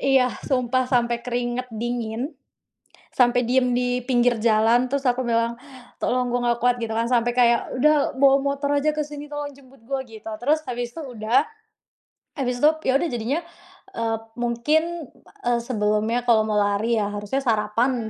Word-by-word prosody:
Iya, 265 Hz, -2 st, +3 dB, 0.2 s
sumpah 255 Hz, -1 st, +1 dB
sampai 240 Hz, -1 st, +1 dB
keringat 245 Hz, +1 st, -3 dB
dingin. 240 Hz, +4 st, -3 dB, 0.8 s
Sampai 245 Hz, -1 st, +3 dB
diam 250 Hz, 0 st, +2 dB
di 245 Hz, 0 st, 0 dB
pinggir 245 Hz, -2 st, +2 dB
jalan 225 Hz, +2 st, +3 dB
terus 280 Hz, -1 st, 0 dB
aku 250 Hz, +1 st, -1 dB
bilang, 230 Hz, 0 st, 0 dB, 0.4 s
"Tolong 250 Hz, 0 st, 0 dB
gua 245 Hz, 0 st, 0 dB
enggak 235 Hz, -, -9 dB
kuat," 245 Hz, 0 st, +3 dB
gitu 230 Hz, -2 st, -3 dB
kan. 230 Hz, +1 st, 0 dB
Sampai 240 Hz, -1 st, +2 dB
kayak, 240 Hz, -1 st, +2 dB
"Sudah 295 Hz, +2 st, +3 dB
bawa 275 Hz, +1 st, +5 dB
motor 280 Hz, 0 st, -1 dB
saja 305 Hz, +2 st, +1 dB
ke 305 Hz, -, -1 dB
sini 295 Hz, 0 st, -7 dB
tolong 290 Hz, 0 st, -4 dB
jemput 270 Hz, -2 st, -19 dB
gua," 270 Hz, -1 st, -2 dB
gitu. 225 Hz, -2 st, -10 dB
Terus 295 Hz, +7 st, +1 dB
habis 240 Hz, -1 st, -4 dB
itu 330 Hz, -, -7 dB
sudah. 245 Hz, -2 st, +1 dB, 0.9 s
Habis 250 Hz, -4 st, -2 dB
itu 300 Hz, -, +8 dB, 0.2 s
iya -, -, +4 dB
sudah 330 Hz, +3 st, -1 dB
jadinya, 240 Hz, +6 st, -1 dB, 0.5 s
eee, 225 Hz, -4 st, -1 dB, 0.2 s
mungkin, 240 Hz, +7 st, +1 dB, 0.6 s
eee, 240 Hz, -1 st, +2 dB
sebelumnya 220 Hz, 0 st, 0 dB
kalau 220 Hz, -3 st, +4 dB
mau 210 Hz, -, +1 dB
lari 205 Hz, +3 st, +1 dB
ya 205 Hz, -1 st, -1 dB
harusnya 205 Hz, +6 st, -2 dB
sarapan. 225 Hz, +1 st, 0 dB
245 Hz, 165 wpm, -23 LUFS, 230-265 Hz, 0.9 s, itu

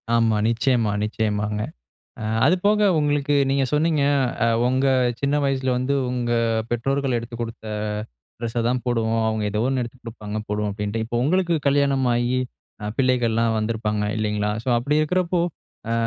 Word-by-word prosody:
ஆமா. 115 Hz, -2 st, +3 dB
நிச்சயமா, 115 Hz, -1 st, +1 dB
நிச்சயமாங்க. 105 Hz, -1 st, -1 dB, 0.6 s
அ -, -, -4 dB, 0.2 s
அது 175 Hz, -, +5 dB
போக 210 Hz, 0 st, +4 dB
உங்களுக்கு 145 Hz, -1 st, +1 dB
நீங்க 135 Hz, 0 st, +2 dB
சொன்னீங்க, 155 Hz, 0 st, +2 dB, 0.4 s
அ -, -, +3 dB, 0.2 s
உங்க 130 Hz, +2 st, +2 dB, 0.3 s
சின்ன 140 Hz, +1 st, +1 dB
வயசுல 135 Hz, -1 st, 0 dB
வந்து, 130 Hz, +3 st, 0 dB, 0.2 s
"உங்க 120 Hz, -1 st, -1 dB, 0.4 s
பெற்றோர்கள் 135 Hz, +2 st, 0 dB
எடுத்துக் 120 Hz, 0 st, -6 dB
குடுத்த 115 Hz, -1 st, -6 dB, 0.7 s
ட்ரெஸ்ஸ 115 Hz, 0 st, -2 dB
தான் 125 Hz, +1 st, 0 dB
போடுவோம். 115 Hz, -2 st, +1 dB
அவங்க 110 Hz, -1 st, -1 dB
ஏதோ 105 Hz, +1 st, 0 dB
ஒண்ணு 130 Hz, -1 st, 0 dB
எடுத்து 120 Hz, +1 st, -7 dB
குடுப்பாங்க 110 Hz, -2 st, -6 dB
போடுவோம்." 105 Hz, 0 st, -1 dB
அப்டீன்ட்டு. 105 Hz, +2 st, -2 dB
இப்போ 120 Hz, +1 st, -2 dB
உங்களுக்கு 175 Hz, +3 st, +2 dB
கல்யாணம் 140 Hz, -1 st, +2 dB
ஆயி 120 Hz, +2 st, +1 dB, 0.4 s
அ 105 Hz, -, -2 dB
பிள்ளைகள்லாம் 115 Hz, -3 st, +2 dB
வந்திருப்பாங்க, 110 Hz, -1 st, -1 dB
இல்லைங்களா? 105 Hz, -1 st, 0 dB
ஸோ -, -, -14 dB
அப்படி 140 Hz, +5 st, 0 dB
இருக்கிறப்போ, 180 Hz, +2 st, +1 dB, 0.5 s
"அ -, -, +1 dB
120 Hz, 150 wpm, -23 LUFS, 110-135 Hz, 0.7 s, அது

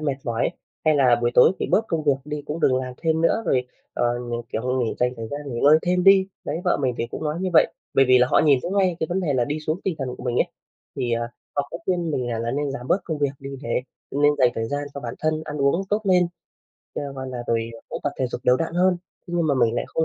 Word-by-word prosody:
mệt 145 Hz, -3 st, -1 dB
mỏi, 115 Hz, +3 st, 0 dB, 0.3 s
hay 155 Hz, -1 st, +4 dB
là 125 Hz, -4 st, +5 dB
buổi 120 Hz, 0 st, +2 dB
tối 125 Hz, -, +7 dB
thì -, -, -1 dB
bớt 225 Hz, -, +3 dB
công 165 Hz, -2 st, -1 dB
việc 145 Hz, -, +5 dB
đi 150 Hz, 0 st, -5 dB
cũng 155 Hz, +3 st, -4 dB
đừng 130 Hz, -, +3 dB
làm 130 Hz, -1 st, -3 dB
thêm 160 Hz, +2 st, 0 dB
nữa 170 Hz, +7 st, +2 dB
rồi, 125 Hz, -1 st, +1 dB, 0.3 s
ờ, 120 Hz, -, +1 dB, 0.2 s
mình, 120 Hz, 0 st, -2 dB
kiểu, 125 Hz, +3 st, -1 dB
nghỉ 115 Hz, -, -1 dB
dành 125 Hz, 0 st, +2 dB
thời 115 Hz, -1 st, -6 dB
gian 145 Hz, +4 st, -5 dB
nghỉ 120 Hz, -4 st, -4 dB
ngơi 150 Hz, +2 st, +7 dB
thêm 180 Hz, 0 st, +1 dB
đi. 195 Hz, -1 st, +7 dB, 0.2 s
Đấy, 165 Hz, -, -3 dB
vợ 180 Hz, -, +3 dB
mình 130 Hz, -3 st, 0 dB
thì 120 Hz, -, -1 dB
cũng -, -, -5 dB
nói 155 Hz, +3 st, -2 dB
như 185 Hz, 0 st, -1 dB
vậy, 160 Hz, -, +5 dB, 0.2 s
bởi 135 Hz, -, +6 dB
vì 130 Hz, 0 st, +7 dB
là 125 Hz, -, +5 dB
họ -, -, +5 dB
nhìn 145 Hz, -4 st, +5 dB
thấy 175 Hz, -, -3 dB
ngay 190 Hz, -3 st, +2 dB
cái 160 Hz, -, 0 dB
vấn 180 Hz, +2 st, 0 dB
đề 165 Hz, -6 st, 0 dB
là 125 Hz, -2 st, +2 dB
đi 150 Hz, +4 st, -3 dB
xuống 155 Hz, +4 st, -2 dB
tinh 190 Hz, -, 0 dB
thần 135 Hz, -2 st, -3 dB
của -, -, -10 dB
mình 120 Hz, -1 st, -1 dB
ấy. -, -, +3 dB, 0.5 s
Thì, 120 Hz, -1 st, -1 dB
à, 115 Hz, 0 st, -1 dB, 0.3 s
họ 145 Hz, -, 0 dB
cũng 170 Hz, -, -6 dB
khuyên 175 Hz, -3 st, 0 dB
mình 125 Hz, -4 st, -1 dB
là 115 Hz, -, -2 dB
là 115 Hz, +1 st, -2 dB
nên 145 Hz, +2 st, -1 dB
giảm 130 Hz, -2 st, -6 dB
bớt 195 Hz, -, +2 dB
công 160 Hz, -3 st, -3 dB
việc 145 Hz, -1 st, +1 dB
đi 135 Hz, 0 st, -8 dB
để 120 Hz, 0 st, -1 dB, 0.3 s
nên 145 Hz, +1 st, +3 dB
dành 125 Hz, -2 st, +5 dB
thời 115 Hz, -, -2 dB
gian 145 Hz, +2 st, -2 dB
cho 140 Hz, -, -5 dB
bản 120 Hz, -2 st, -5 dB
thân 155 Hz, 0 st, 0 dB
ăn 150 Hz, -, -6 dB
uống 140 Hz, +6 st, +2 dB
tốt 210 Hz, +1 st, +2 dB
lên, 180 Hz, -2 st, +4 dB, 0.7 s
cha -, -, -3 dB
gọi 130 Hz, -1 st, -5 dB
là, 125 Hz, -2 st, -5 dB
rồi 115 Hz, 0 st, 0 dB, 0.2 s
cũng -, -, -5 dB
tập 145 Hz, -, -1 dB
thể 130 Hz, -, +1 dB
dục 120 Hz, -, -5 dB
đều 125 Hz, 0 st, +5 dB
đặn 165 Hz, +2 st, -3 dB
hơn, 180 Hz, +1 st, +3 dB, 0.3 s
thế 175 Hz, -, -5 dB
nhưng 170 Hz, -2 st, +1 dB
mà 145 Hz, -, +2 dB
mình 120 Hz, -3 st, +2 dB
lại -, -, -1 dB
không 160 Hz, -, 0 dB
145 Hz, 290 wpm, -23 LUFS, 125-165 Hz, 0.7 s, tối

